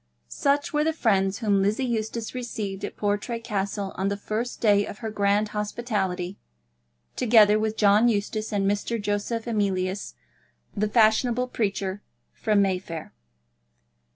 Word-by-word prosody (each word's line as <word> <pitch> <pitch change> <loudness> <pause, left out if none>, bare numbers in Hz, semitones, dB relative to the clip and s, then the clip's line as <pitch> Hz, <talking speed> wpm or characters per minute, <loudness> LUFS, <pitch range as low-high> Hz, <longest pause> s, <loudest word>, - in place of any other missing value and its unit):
Such 285 - 0
were 300 0 +2
the 320 +1 +1
friends 195 -9 +1
whom 205 -4 +2
Lizzie 210 +7 +1
Eustace 225 -1 -3
received 215 -6 -5
at - - -5
Portray 205 +3 -1
Castle 200 -3 -3
on 190 - 0
the 200 0 -1
first 220 +4 -3
day 205 -2 +4
of 200 - -7
her 220 -1 -5
grand 205 0 +1
hospitality, 205 -4 -2 0.8
together 215 -3 +5
with 220 0 -1
John 210 +3 +5
Eustace 215 0 -2
and 200 -2 0
Mr. 205 +3 -1
Joseph 205 +2 -2
Emilius, 195 -4 -1 0.6
the 210 0 0
fashionable 235 +3 +3
preacher 200 -3 -2 0.3
from 210 -2 +2
Mayfair. 180 -4 -3
210 Hz, 135 wpm, -25 LUFS, 200-230 Hz, 0.8 s, together